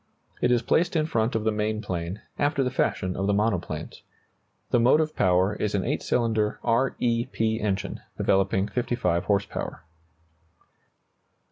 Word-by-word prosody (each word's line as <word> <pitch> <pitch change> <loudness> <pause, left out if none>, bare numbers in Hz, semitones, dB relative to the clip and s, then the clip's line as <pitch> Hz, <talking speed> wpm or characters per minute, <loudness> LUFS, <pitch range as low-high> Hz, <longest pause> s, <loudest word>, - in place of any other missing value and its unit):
It 125 - +3
is 120 -1 +3
placed 175 +2 +2
in 155 -1 +2
front 115 -7 0
of 110 - 0
the 110 - +2
main 105 0 -1
plane, 90 -1 -4 0.2
after 145 -1 +2
the 125 - -1
fashion 95 -7 0
of 95 +1 -1
the 100 - +2
monoplanes. 100 -7 -2 0.7
The 120 - +4
motive 155 +6 +3
power 95 +1 +3
is 105 0 -2
an 95 - 0
8 - - -1
cylinder 110 -3 0
R 120 +3 +2
E 115 -1 0
P 110 0 -1
engine, 100 -2 -2 0.2
developing 95 0 +2
55 120 -8 -1
horse 100 -1 +2
power. - - -6
110 Hz, 155 wpm, -26 LUFS, 95-120 Hz, 0.7 s, The